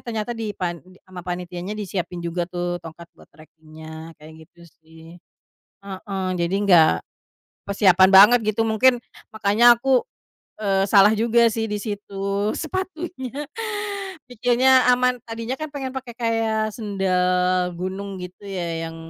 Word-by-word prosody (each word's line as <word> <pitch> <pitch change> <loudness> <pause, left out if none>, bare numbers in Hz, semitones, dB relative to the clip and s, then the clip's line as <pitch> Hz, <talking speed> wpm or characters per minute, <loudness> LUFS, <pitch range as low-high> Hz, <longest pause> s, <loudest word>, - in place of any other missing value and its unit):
ternyata 225 -1 -3
di 220 -2 -4
pan 175 -3 -3 0.3
ama 185 -1 -9
panitianya 180 +2 -5
disiapin 180 -3 -4
juga 170 +1 -2
tuh 175 0 -3
tongkat 165 +1 -11
buat - - -19
trekingnya 160 +1 -12
kayak 160 +1 -13
gitu 175 - -24 0.2
sih. 160 +1 -15 0.7
Heeh, 190 0 -5
jadi 170 +3 0
gak 175 -5 +6 0.8
persiapan 190 -2 +4
banget 210 +6 +8
gitu 225 - -1
mungkin 240 +3 +3 0.4
makanya 220 +2 +2
aku, 260 +1 +2 0.6
eee, 195 -2 +1
salah 200 0 +7
juga 235 +2 +3
sih 225 0 -2
di 210 - -1
situ 200 -1 -3
sepatunya, 320 -6 -5 0.9
pikirnya 250 +2 +3
aman. 250 0 +1
Tadinya 230 +2 -4
kan 310 - -4
pengen 265 -2 -5
pake 250 -3 -7
kayak 225 -2 0
sendal 185 -3 0
gunung 190 +2 -5
gitu 180 +3 -10
ya 170 -3 -4
yang 165 - -10
200 Hz, 130 wpm, -22 LUFS, 175-230 Hz, 0.9 s, banget